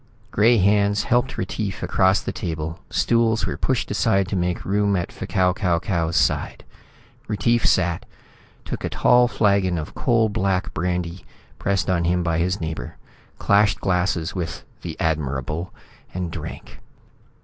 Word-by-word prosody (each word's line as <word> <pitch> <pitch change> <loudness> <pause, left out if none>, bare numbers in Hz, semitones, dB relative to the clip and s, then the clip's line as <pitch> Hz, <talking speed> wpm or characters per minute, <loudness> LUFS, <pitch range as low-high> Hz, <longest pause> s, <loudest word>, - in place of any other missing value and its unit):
Gray 115 +3 +4
hands 100 +1 +3
helped 120 +2 +1
Retief 100 -4 -3
across 95 +1 +3
the - - -4
table, 80 0 -4
stools 115 -1 +2
were - - -3
pushed 130 -5 -1
aside 100 -2 +2
to 100 - -2
make 90 -1 -1
room 100 +1 +1
at 90 -2 -2
F'Kau 90 -1 0
Kau 90 -5 +1
Kau's 85 -2 -1
side. - - 0 0.6
Retief 115 +3 +1
sat, 85 -2 +1 0.6
took - - -5
a - - -1
tall 125 0 +4
flagon 100 -6 +2
of 80 -1 -5
coal 115 -3 +2
black 100 -3 -1
brandy 90 +1 -2 0.4
pressed 100 -2 0
on 85 -2 +1
him 90 +1 +1
by 85 -1 0
his 90 +3 0
neighbor, 80 -7 -5 0.4
clashed 100 +1 +3
glasses 90 -2 0
with 90 -4 -4 0.2
The - - -7
Admirable 75 +1 -2 0.4
and 90 -2 -3
drank. - - -8
95 Hz, 145 wpm, -22 LUFS, 85-105 Hz, 0.6 s, Gray